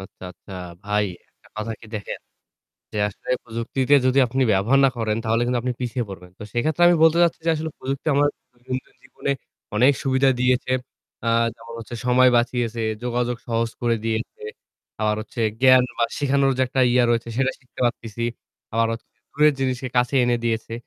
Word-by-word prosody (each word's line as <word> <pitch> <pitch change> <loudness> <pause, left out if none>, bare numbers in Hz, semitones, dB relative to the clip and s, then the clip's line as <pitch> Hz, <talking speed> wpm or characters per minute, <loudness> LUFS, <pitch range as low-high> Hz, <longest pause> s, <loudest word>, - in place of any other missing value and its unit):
আচ্ছা, 95 - -13
আচ্ছা 95 - -15 0.3
ভাই 105 0 +1 0.3
একটা - - -25
কথা 110 +1 -3
কি - - -13
দেখেন। 105 -2 -5 0.7
যে - - -3
আসলে 105 - -14 0.2
প্রযুক্তিতে 120 +4 0
যদি 130 +1 +3
আপনি 130 +3 0
ব্যবহার 105 +8 +3
না - - +7
করেন 110 -2 -1
তাহলে 115 +1 +1
কিন্তু 125 0 +1
আপনি 125 0 -1
পিছিয়ে 120 0 -2
পড়বেন। 90 -2 -10
তো - - -9
সেক্ষেত্রে 155 +8 0
আমি 175 - +5
বলতে 160 +1 +5
চাচ্ছি 170 -1 +2
যে - - +4
আসলে 160 0 -3
প্রযুক্তি 135 +3 -4
আমার 145 +1 +4 0.2
দৈনন্দিন 130 +1 -7
জীবনে - - -4 0.5
অনেক 130 +6 +6
সুবিধা 135 0 +3
দিয়েছে। 125 0 +2 0.5
আ - - -3 0.3
যেমন 115 0 -12
হচ্ছে 115 +1 -8
সময় 125 +1 +6
বাঁচিয়েছে, 120 -1 0 0.2
যোগাযোগ 125 0 -1
সহজ 115 -1 0
করে 120 -1 +2
দিয়েছে। 115 - -3 0.6
আবার 105 0 +2
হচ্ছে 115 +2 -7 0.2
জ্ঞান 130 -1 +7 0.2
বা 120 - +4
শিখানোর 140 -1 +2
যে - - +3
একটা 130 +1 -1
ইয়ে 125 0 +4
রয়েছে 115 0 0
সেটা 135 +1 +1
শিখতে 125 - -15
পারতেছি। 115 -1 -3 0.5
আবার 115 +1 +2
হচ্ছে 115 - -7
যে - - -43
দূরের 150 0 +4
জিনিসকে 130 -1 -1
কাছে 125 +2 +2
এনে 120 0 +2
দিয়েছে। 115 -1 -1
120 Hz, 180 wpm, -23 LUFS, 115-130 Hz, 0.7 s, না